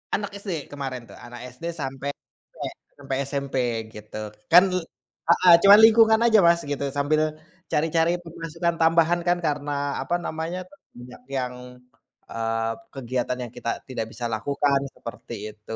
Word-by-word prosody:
Anak 205 0 -4
SD 170 -9 -5
kemarin 135 -4 -5
tuh. - - -13
Anak 120 0 -10
SD 165 +6 -6
sampai 135 -2 -4
SMP - - -11
sampai 135 -2 -3
SMP 140 -1 -4 0.4
gitu. 105 0 -8 0.3
Kan 180 +2 +9
le 180 - 0 0.5
heeh, 175 0 +7
cuma 200 +1 +10
lingkungan 220 0 +7
aja, 220 -2 +6
Mas, 170 0 +4
gitu 140 0 -3
sambil 150 +2 +2 0.5
cari-cari 165 +2 +1
pemasukan 165 +1 -3
tambahan 165 +1 +4
kan 175 0 +3
karena, 145 -1 -1
apa 175 - -1
namanya, 165 +3 -4 0.3
banyak 125 0 -12
yang, 130 -2 -3 0.8
eee 115 0 -1 0.2
kegiatan 125 -1 -2
yang 115 - -11
kita 115 - -3 0.2
tidak 115 -3 -3
bisa 120 - -6
lakukan 140 +5 +1 0.2
seperti 115 0 -8 0.2
itu. 105 +1 -8
145 Hz, 145 wpm, -24 LUFS, 125-170 Hz, 0.8 s, cuma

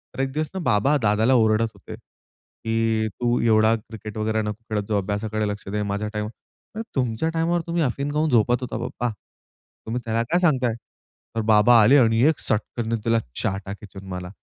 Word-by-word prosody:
तर - - -8
एक 135 0 -1
दिवस 155 +1 -1
ना 190 - -3
बाबा 110 +4 +3
दादाला 110 +4 +3
ओरडत 110 -2 +3
होते 100 - -10
की 115 -1 -3
"तू 120 +4 -1
एवढा 110 -1 +4
क्रिकेट 110 -1 -9
वगैरे 110 0 0
नको 105 +1 -5
खेळत 105 -1 -1
जाऊ 105 - +2
अभ्यासाकडे 105 +2 -2
लक्ष 105 -1 -5
दे. 105 +1 -2
माझ्या 100 +1 -2
टाईम" 105 0 -2
म्हणलं, 165 - -11
"तुमच्या 125 +3 0
टाईमवर 165 +1 0
तुम्ही 170 0 0
अफीम 140 +2 -2
खाऊन 155 +1 +1
झोपत 120 0 +3
होता 125 -2 -4
पप्पा. 120 - -3 0.8
तुम्ही 120 +3 -3
त्याला 115 0 0
काय 175 - +3
सांगताय?" 130 -9 +2 0.6
तर 115 - 0
बाबा 110 +2 +5
आले 130 +7 +6
आणि 115 -3 +4
एक 160 - -1
सटकनने 115 +2 -2
दिला 115 0 +3 0.2
चाटा 95 0 -2
खिचून 100 -2 -11
मला. 90 -1 -5
115 Hz, 185 wpm, -23 LUFS, 105-125 Hz, 0.8 s, आले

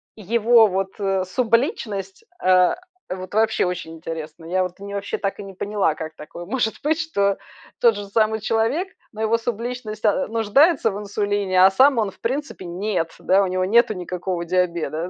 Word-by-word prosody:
его 225 +2 +4
вот, 190 0 -2
э, 195 -2 0
субличность, 225 - -1 0.2
э, 185 -1 +4 0.3
вот 185 +1 -6
вообще 220 -1 +2
очень 180 -2 -4
интересно! 160 0 -7
Я 185 +3 +1
вообще 200 +2 -5
так 195 -1 -3
и - - -5
не 195 -1 -10
поняла, 200 -4 0
как 160 0 -7
такое 170 +3 -9
может 220 +2 -1
быть, 310 +2 +1
что 200 -12 0 0.4
тот 235 -2 +5
же 205 0 -5
самый 220 +2 +1
человек, 225 - 0 0.2
но 215 - -8
его 220 +1 +2
субличность, 230 -1 -4
э, 220 +7 +2
нуждается 230 - +3
в 195 - -5
инсулине, 205 -2 +2
а - - +8
сам 265 +6 +5
он, 215 -3 +1
в - - -25
принципе, 270 -3 -3
нет, 175 -1 -2
да. 195 +2 +3
У - - 0
него 185 0 0
нету 230 +3 +4
никакого 180 -1 -4
диабета, 170 -1 -1
200 Hz, 170 wpm, -22 LUFS, 185-225 Hz, 0.4 s, а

